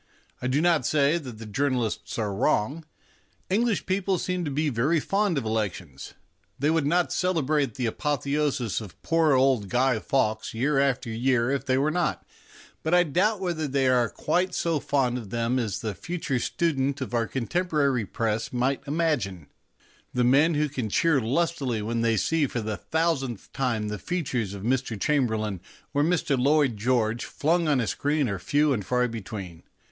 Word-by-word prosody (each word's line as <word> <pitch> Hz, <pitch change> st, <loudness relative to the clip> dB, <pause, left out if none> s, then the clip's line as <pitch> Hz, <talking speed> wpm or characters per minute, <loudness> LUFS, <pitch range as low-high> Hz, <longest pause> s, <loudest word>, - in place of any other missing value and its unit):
I 125 Hz, -, -1 dB
do 135 Hz, +4 st, +1 dB
not 170 Hz, -4 st, +3 dB
say 145 Hz, +5 st, +2 dB
that 125 Hz, -8 st, -9 dB
the 115 Hz, -, -9 dB
journalists 125 Hz, 0 st, -1 dB
are 105 Hz, -3 st, -1 dB
wrong. 130 Hz, +10 st, 0 dB, 0.7 s
English 225 Hz, +1 st, +1 dB
people 190 Hz, 0 st, 0 dB
seem 180 Hz, 0 st, -2 dB
to -, -, -2 dB
be 150 Hz, +2 st, 0 dB
very 140 Hz, +7 st, +1 dB
fond 195 Hz, +1 st, 0 dB
of 130 Hz, -, -2 dB
elections. 100 Hz, -10 st, -4 dB, 0.4 s
They 145 Hz, +3 st, +1 dB
would 160 Hz, -3 st, +1 dB
not 175 Hz, +3 st, +2 dB
celebrate 150 Hz, -, 0 dB
the 125 Hz, -, -2 dB
apotheosis 140 Hz, -2 st, -1 dB
of 100 Hz, -6 st, -11 dB
poor 165 Hz, -2 st, +3 dB
old 130 Hz, -6 st, +2 dB
Guy 125 Hz, 0 st, +2 dB
Fawkes 110 Hz, -3 st, -1 dB
year 135 Hz, +4 st, +1 dB
after 135 Hz, -3 st, 0 dB
year 120 Hz, +1 st, +1 dB
if 140 Hz, 0 st, -2 dB
they 130 Hz, 0 st, +2 dB
were 145 Hz, +3 st, +2 dB
not, 175 Hz, +2 st, -1 dB, 0.6 s
but 160 Hz, +2 st, +2 dB
I 180 Hz, -, +6 dB
doubt 190 Hz, +6 st, +1 dB
whether 170 Hz, -4 st, -1 dB
they 135 Hz, -1 st, +1 dB
are 125 Hz, -3 st, +3 dB
quite 180 Hz, +1 st, -1 dB
so 165 Hz, -3 st, 0 dB
fond 125 Hz, -3 st, 0 dB
of 110 Hz, -5 st, -9 dB
them 120 Hz, +3 st, 0 dB
as 110 Hz, -6 st, -2 dB
the 110 Hz, -2 st, -3 dB
future 160 Hz, -, -3 dB
student 140 Hz, -1 st, 0 dB
of 130 Hz, -2 st, -5 dB
our 115 Hz, -1 st, +1 dB
contemporary 140 Hz, -, 0 dB
Press 110 Hz, +2 st, -2 dB
may 125 Hz, +2 st, 0 dB
imagine. 140 Hz, -, -1 dB, 0.6 s
The 125 Hz, -, +2 dB
men 145 Hz, +6 st, +4 dB
who 150 Hz, +1 st, +2 dB
can 130 Hz, -6 st, -4 dB
cheer 155 Hz, +5 st, +3 dB
lustily 130 Hz, -3 st, 0 dB
when 115 Hz, +2 st, -1 dB
they 115 Hz, -1 st, +2 dB
see 160 Hz, +7 st, +1 dB
for 125 Hz, -, -3 dB
the 110 Hz, -1 st, -3 dB
thousandth 155 Hz, -, -2 dB
time 115 Hz, -5 st, -1 dB
the 105 Hz, -1 st, -4 dB
features 130 Hz, -, -2 dB
of 100 Hz, -, -8 dB
Mr. 125 Hz, -2 st, -1 dB
Chamberlain 110 Hz, -, 0 dB, 0.3 s
or 145 Hz, -, +2 dB
Mr. 160 Hz, -2 st, +1 dB
Lloyd 140 Hz, -2 st, +3 dB
George 115 Hz, +1 st, 0 dB
flung 165 Hz, +2 st, 0 dB
on 145 Hz, -3 st, +3 dB
a 120 Hz, -, +1 dB
screen 145 Hz, +4 st, 0 dB
are 100 Hz, -2 st, -3 dB
few 145 Hz, +10 st, +2 dB
and 105 Hz, -5 st, -2 dB
far 125 Hz, +4 st, +1 dB
between. 100 Hz, -7 st, -7 dB
135 Hz, 175 wpm, -26 LUFS, 115-155 Hz, 0.7 s, I